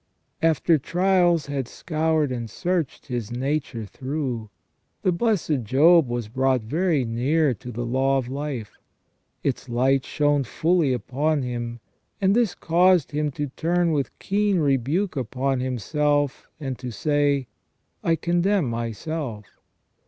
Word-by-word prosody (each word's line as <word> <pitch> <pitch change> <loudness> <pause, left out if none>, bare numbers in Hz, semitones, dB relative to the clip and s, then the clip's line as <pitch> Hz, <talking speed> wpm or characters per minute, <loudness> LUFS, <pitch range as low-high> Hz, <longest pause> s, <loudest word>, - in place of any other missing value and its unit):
After 165 0 +3
trials 175 +1 +2
had 140 -3 -3
scoured 155 -2 0
and 120 -3 -4
searched 175 - -2
his 120 -5 -4
nature 130 -2 -2
through, 130 -2 -4 0.5
the 185 - +3
blessed 170 - +1
Job 150 +7 +5
was 120 -2 -3
brought 130 +2 +1
very 155 +2 +1
near 135 +6 +1
to 125 +3 -9
the 120 +1 -4
law 135 +3 +2
of 130 -3 -2
life; 135 -4 -5 0.6
its 130 -1 -2
light 130 +3 +2
shone 145 -1 +1
fully 160 +3 +1
upon 140 +5 0
him, 120 -1 -4 0.4
and 195 +1 +3
this 235 -6 +2
caused 175 -1 +3
him 150 0 0
to 145 +1 -3
turn 170 +1 +1
with 145 -3 -2
keen 205 0 +1
rebuke 150 - +1
upon 130 +1 -1
himself, 145 +3 0
and 135 -4 -4
to 125 - -5
say: 145 +3 +1 0.3
' - - -47
I 165 - +3
condemn 175 +3 +1
myself. 115 0 -4
145 Hz, 135 wpm, -24 LUFS, 125-165 Hz, 0.6 s, Job